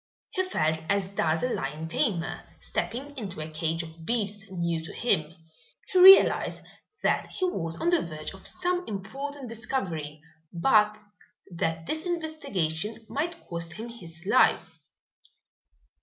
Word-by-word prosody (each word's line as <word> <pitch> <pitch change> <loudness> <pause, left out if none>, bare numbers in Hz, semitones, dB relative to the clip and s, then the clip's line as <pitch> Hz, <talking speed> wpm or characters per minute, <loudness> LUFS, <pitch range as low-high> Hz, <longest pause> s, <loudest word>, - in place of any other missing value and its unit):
He 375 - 0
felt 160 - 0
as 200 -2 +1
does 165 -5 0
a 250 - +1
lion 150 +4 -3
tamer 170 0 -1 0.2
stepping 280 +4 -4
into 190 -6 -6
a 155 +1 -5
cage 165 +1 -1
of 160 0 -11
beasts 205 -1 -1
new 170 -3 -1
to 165 - -8
him. 155 -10 0 0.6
He 370 - +5
realized 385 +2 +8 0.4
that - - +2
he 375 - -2
was 165 - -2
on 345 - +2
the 345 - +4
verge 155 0 -6
of 190 - -3
some 360 0 0
important 265 +7 -5
discovery, 180 - -3 0.3
but 210 +3 +4 0.6
that 165 -1 -1
this 315 - -1
investigation 225 - -2
might 335 +3 -3
cost 170 -1 -4
him 225 +5 -7
his 175 -7 -12
life. - - +3
195 Hz, 140 wpm, -28 LUFS, 165-270 Hz, 0.6 s, realized